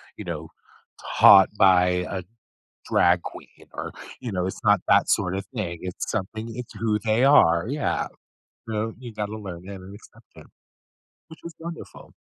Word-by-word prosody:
you -, -, -8 dB
know, -, -, -6 dB, 0.7 s
taught 95 Hz, -2 st, +9 dB
by 90 Hz, -1 st, +4 dB
a 95 Hz, -2 st, -4 dB, 0.7 s
drag 85 Hz, 0 st, +3 dB
queen -, -, -11 dB
or, -, -, -5 dB, 0.3 s
you 120 Hz, -, -5 dB
know, 90 Hz, -1 st, -1 dB
it's 95 Hz, -, -6 dB
not 105 Hz, -2 st, +5 dB
that -, -, +4 dB
sorta 95 Hz, +2 st, 0 dB
thing, 85 Hz, -7 st, -4 dB
it's 90 Hz, -1 st, -5 dB
something 110 Hz, +2 st, -4 dB
it's 125 Hz, -1 st, -7 dB
who 105 Hz, 0 st, 0 dB
they 110 Hz, +3 st, +2 dB
are, 85 Hz, -, +5 dB
yeah. 145 Hz, +1 st, -1 dB, 0.6 s
So, 110 Hz, 0 st, -3 dB
you 120 Hz, -2 st, -10 dB
gotta 105 Hz, 0 st, -4 dB
learn 95 Hz, -5 st, -8 dB
that 100 Hz, -, -7 dB
and 95 Hz, +1 st, -11 dB
accept 105 Hz, -, -18 dB
it, -, -, -14 dB, 0.8 s
which 160 Hz, -, -14 dB
was 170 Hz, -1 st, -8 dB
wonderful. 165 Hz, 0 st, -10 dB
105 Hz, 160 wpm, -24 LUFS, 90-115 Hz, 0.8 s, taught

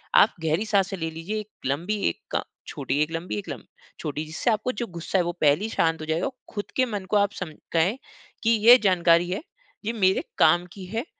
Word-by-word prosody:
आप -, -, +6 dB
गहरी 160 Hz, +6 st, +1 dB
साँसे 200 Hz, -3 st, +1 dB
ले 165 Hz, -1 st, -2 dB
लीजिए 165 Hz, +7 st, -5 dB
1 215 Hz, 0 st, -8 dB, 0.2 s
लंबी, 170 Hz, +11 st, -1 dB
1 -, -, -8 dB, 0.3 s
छोटी, 145 Hz, -, -2 dB
1 155 Hz, +1 st, 0 dB
लंबी 165 Hz, -9 st, -3 dB
1 105 Hz, -, -6 dB
लम -, -, -5 dB, 0.4 s
छोटी। 150 Hz, +1 st, -3 dB
जिससे 160 Hz, +10 st, -2 dB
आपको 215 Hz, +3 st, 0 dB
जो 235 Hz, +1 st, -4 dB
गुस्सा 170 Hz, +2 st, -2 dB
है 180 Hz, -, +3 dB
वो 175 Hz, -, -1 dB
पहले 150 Hz, +5 st, +4 dB
ही 220 Hz, -, -2 dB
शांत 165 Hz, -6 st, +1 dB
हो -, -, -5 dB
जाएगा 160 Hz, +3 st, 0 dB
औ -, -, -1 dB, 0.2 s
खुद 205 Hz, -1 st, -3 dB
के 255 Hz, -, +3 dB
मन 205 Hz, -5 st, -4 dB
को 210 Hz, -, +3 dB
आप 200 Hz, 0 st, +3 dB
सम 180 Hz, -4 st, -5 dB, 0.2 s
कहें 175 Hz, +9 st, +2 dB, 0.5 s
कि 230 Hz, -, +3 dB
ये 230 Hz, +2 st, +8 dB
जानकारी 175 Hz, -2 st, +4 dB
है, 185 Hz, -, -2 dB, 0.4 s
ये 230 Hz, -, -1 dB
मेरे 190 Hz, -4 st, +2 dB
काम 175 Hz, +3 st, +5 dB
की 190 Hz, -2 st, -9 dB
है। 225 Hz, +7 st, -3 dB
185 Hz, 225 wpm, -25 LUFS, 165-215 Hz, 0.5 s, ये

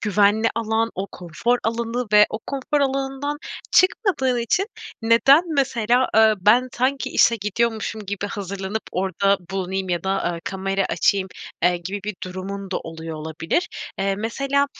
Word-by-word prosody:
güvenli 210 Hz, +1 st, +3 dB
alan, 225 Hz, 0 st, 0 dB
o 195 Hz, +2 st, -3 dB
konfor 180 Hz, +8 st, -1 dB
alanı 230 Hz, +2 st, -1 dB
ve 210 Hz, 0 st, +8 dB
o 215 Hz, -, -3 dB
konfor 280 Hz, +2 st, -1 dB
alanından 270 Hz, +1 st, -1 dB, 0.4 s
çıkmadığın 330 Hz, -, +3 dB
için, 300 Hz, -, +1 dB, 0.4 s
"Neden 235 Hz, +7 st, +6 dB
mesela, 250 Hz, -2 st, +2 dB
eee, 220 Hz, 0 st, +6 dB
ben 240 Hz, +6 st, +4 dB
sanki 265 Hz, +2 st, 0 dB
işe 235 Hz, -, +4 dB
gidiyormuşum 220 Hz, 0 st, -2 dB
gibi 205 Hz, 0 st, -3 dB
hazırlanıp 200 Hz, +1 st, -4 dB
orada 195 Hz, +2 st, +1 dB
bulunayım 190 Hz, 0 st, -2 dB
ya 175 Hz, -1 st, -1 dB
da, 190 Hz, -2 st, 0 dB
eee, 170 Hz, -, -7 dB
kamera 195 Hz, 0 st, -1 dB
açayım?" 195 Hz, -1 st, +1 dB, 0.3 s
eee, 180 Hz, -, +5 dB
gibi 200 Hz, +3 st, -4 dB
bir 210 Hz, 0 st, -3 dB
durumun 190 Hz, +1 st, -6 dB
da -, -, -1 dB
oluyor 160 Hz, 0 st, -7 dB
olabilir. 160 Hz, -, -2 dB, 0.3 s
Eee, 195 Hz, 0 st, +1 dB
mesela, 275 Hz, +6 st, 0 dB
215 Hz, 145 wpm, -22 LUFS, 195-245 Hz, 0.4 s, ve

